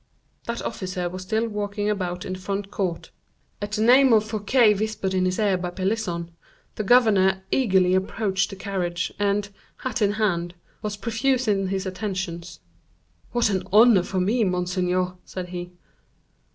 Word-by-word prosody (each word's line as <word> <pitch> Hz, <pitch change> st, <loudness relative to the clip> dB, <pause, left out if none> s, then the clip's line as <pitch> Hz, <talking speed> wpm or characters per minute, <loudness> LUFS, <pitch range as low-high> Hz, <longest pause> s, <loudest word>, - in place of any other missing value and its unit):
That 235 Hz, 0 st, -4 dB
officer 185 Hz, -4 st, -3 dB
was 185 Hz, +1 st, -7 dB
still 220 Hz, +4 st, -1 dB
walking 205 Hz, -1 st, -3 dB
about 180 Hz, -4 st, -2 dB
in 185 Hz, -, -4 dB
the 185 Hz, -, -6 dB
front 200 Hz, +2 st, -4 dB
court. 180 Hz, -4 st, -3 dB, 0.5 s
At 205 Hz, 0 st, -4 dB
the 215 Hz, 0 st, +1 dB
name 255 Hz, +2 st, +6 dB
of 215 Hz, -1 st, +5 dB
Fouquet, 215 Hz, +1 st, +3 dB
whispered 210 Hz, -2 st, -2 dB
in 185 Hz, -1 st, +2 dB
his 185 Hz, 0 st, 0 dB
ear 200 Hz, -4 st, +2 dB
by 180 Hz, 0 st, -3 dB
Pelisson, 185 Hz, -2 st, -2 dB, 0.4 s
the 215 Hz, -, -3 dB
governor 195 Hz, -5 st, +4 dB
eagerly 190 Hz, -8 st, +3 dB
approached 195 Hz, +1 st, 0 dB
the -, -, -7 dB
carriage, 185 Hz, -3 st, -3 dB
and, 205 Hz, 0 st, +1 dB, 0.3 s
hat 255 Hz, -2 st, -4 dB
in 205 Hz, -1 st, +3 dB
hand, 175 Hz, -5 st, -1 dB, 0.3 s
was 210 Hz, -1 st, -4 dB
profuse 240 Hz, +4 st, 0 dB
in 195 Hz, -2 st, +1 dB
his 190 Hz, 0 st, -2 dB
attentions. 185 Hz, -, -5 dB, 0.7 s
"What 240 Hz, -3 st, +2 dB
an 190 Hz, -2 st, 0 dB
honor 220 Hz, -1 st, +7 dB
for 185 Hz, +1 st, -3 dB
me, 220 Hz, +6 st, +2 dB
monseigneur," 180 Hz, 0 st, 0 dB
said 180 Hz, -1 st, -7 dB
he. 175 Hz, 0 st, -6 dB
195 Hz, 160 wpm, -24 LUFS, 185-215 Hz, 0.7 s, honor